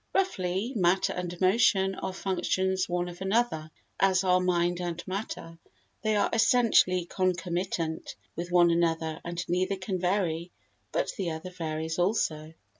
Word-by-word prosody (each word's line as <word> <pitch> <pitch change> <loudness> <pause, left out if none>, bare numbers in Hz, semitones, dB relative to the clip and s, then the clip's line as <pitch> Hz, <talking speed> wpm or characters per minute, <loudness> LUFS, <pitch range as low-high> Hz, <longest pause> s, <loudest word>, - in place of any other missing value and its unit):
Roughly, 205 - 0
matter 190 0 +2
and 175 -1 -5
motion 190 0 +3
are 190 - -4
functions 190 0 -1
one 175 0 -1
of 175 +1 -9
another, 190 -6 0 0.3
as 190 -1 +3
are 185 -1 +4
mind 175 -1 +1
and 175 -1 -4
matter; 185 -4 -5 0.4
they 215 -1 +1
are 205 - +3
essentially 225 -6 +4
concomitant 175 -2 -2 0.2
with 175 +2 -5
one 175 -1 +5
another, 165 -2 0
and 170 0 -4
neither 185 +3 0
can 185 0 -3
vary 175 -2 0 0.4
but - - 0
the 185 -3 0
other 160 +3 -6
varies 160 -1 -3
also. 160 -5 0
180 Hz, 140 wpm, -28 LUFS, 170-190 Hz, 0.4 s, one